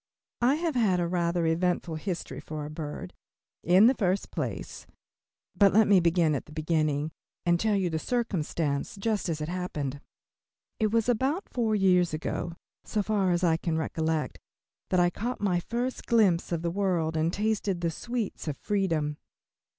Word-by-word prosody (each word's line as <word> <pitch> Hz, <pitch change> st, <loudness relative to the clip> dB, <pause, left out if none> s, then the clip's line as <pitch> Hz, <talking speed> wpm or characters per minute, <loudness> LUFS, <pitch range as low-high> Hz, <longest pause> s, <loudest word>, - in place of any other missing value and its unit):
I 250 Hz, +4 st, +4 dB
have 325 Hz, 0 st, -1 dB
had 210 Hz, -8 st, +2 dB
a 175 Hz, -, +1 dB
rather 170 Hz, -1 st, 0 dB
eventful 170 Hz, +1 st, 0 dB
history 170 Hz, +2 st, -4 dB
for 155 Hz, -1 st, -6 dB
a 150 Hz, -, -7 dB
bird. 150 Hz, -, -6 dB, 0.5 s
In 185 Hz, +5 st, +6 dB
the 250 Hz, -, +6 dB
first 195 Hz, -5 st, -1 dB
place -, -, -5 dB, 0.7 s
but 200 Hz, -2 st, +5 dB
let 220 Hz, +1 st, +5 dB
me 200 Hz, -2 st, +6 dB
begin 170 Hz, -2 st, +3 dB
at 140 Hz, -, -3 dB
the -, -, -14 dB
beginning 155 Hz, -1 st, 0 dB, 0.3 s
and 175 Hz, 0 st, +3 dB
tell 215 Hz, +1 st, +2 dB
you 190 Hz, -2 st, +1 dB
the 160 Hz, -, -1 dB
circumstance 165 Hz, -, -1 dB
just 205 Hz, -1 st, -1 dB
as 155 Hz, -2 st, -2 dB
it 150 Hz, -, -2 dB
happened. 150 Hz, -6 st, -3 dB, 0.8 s
It 220 Hz, -, +3 dB
was 230 Hz, 0 st, +2 dB
about 265 Hz, -, 0 dB
four 225 Hz, -3 st, 0 dB
years 180 Hz, -4 st, +3 dB
ago, 165 Hz, +2 st, -3 dB, 0.3 s
so 210 Hz, -, -1 dB
far 200 Hz, -3 st, +1 dB
as 175 Hz, 0 st, +1 dB
I 165 Hz, -2 st, +3 dB
can 165 Hz, -1 st, -1 dB
recollect, 160 Hz, -1 st, -1 dB, 0.5 s
that 185 Hz, -, +2 dB
I 175 Hz, 0 st, +4 dB
caught 240 Hz, +7 st, -3 dB
my 185 Hz, -4 st, +1 dB
first 240 Hz, +7 st, -3 dB
glimpse 200 Hz, -8 st, +3 dB
of 170 Hz, -1 st, -1 dB
the 170 Hz, -, 0 dB
world 175 Hz, -4 st, 0 dB
and 160 Hz, +1 st, +1 dB
tasted 205 Hz, -3 st, -1 dB
the 170 Hz, -1 st, 0 dB
sweets 235 Hz, -1 st, -4 dB
of 150 Hz, -, -2 dB
freedom. 165 Hz, -8 st, -1 dB
180 Hz, 175 wpm, -28 LUFS, 160-210 Hz, 0.8 s, In